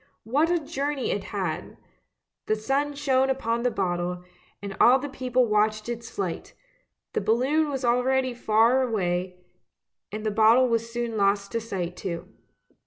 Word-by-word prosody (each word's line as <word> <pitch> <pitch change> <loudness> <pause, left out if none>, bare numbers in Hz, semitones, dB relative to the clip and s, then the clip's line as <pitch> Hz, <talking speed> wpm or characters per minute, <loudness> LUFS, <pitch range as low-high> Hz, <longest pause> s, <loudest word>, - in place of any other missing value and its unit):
What 285 +9 +1
a 350 - +3
journey 285 -3 -2
it 200 - -3
had! 185 -6 -4 0.7
The 215 - +2
sun 275 +6 -1
shone 270 -2 +2
upon 235 -3 -1
the 245 - +2
bottle, 180 -3 -2 0.4
and 200 -1 -6
all 250 +2 +7
the 280 +2 -5
people 255 -1 +1
watched 215 0 +1
its 235 -1 -5
flight; 185 -4 -5 0.6
the - - 0
balloon 260 +9 +2
was 270 -2 -3
already 255 +1 +2
far 235 +2 +3
away, 180 -6 -1 0.7
and 215 +1 -5
the 215 - +1
bottle 225 +4 +5
was 230 -1 -1
soon 235 -1 -3
lost 200 0 +1
to 230 - -1
sight 180 -6 -4
too. 170 -3 -5
230 Hz, 155 wpm, -26 LUFS, 205-260 Hz, 0.7 s, all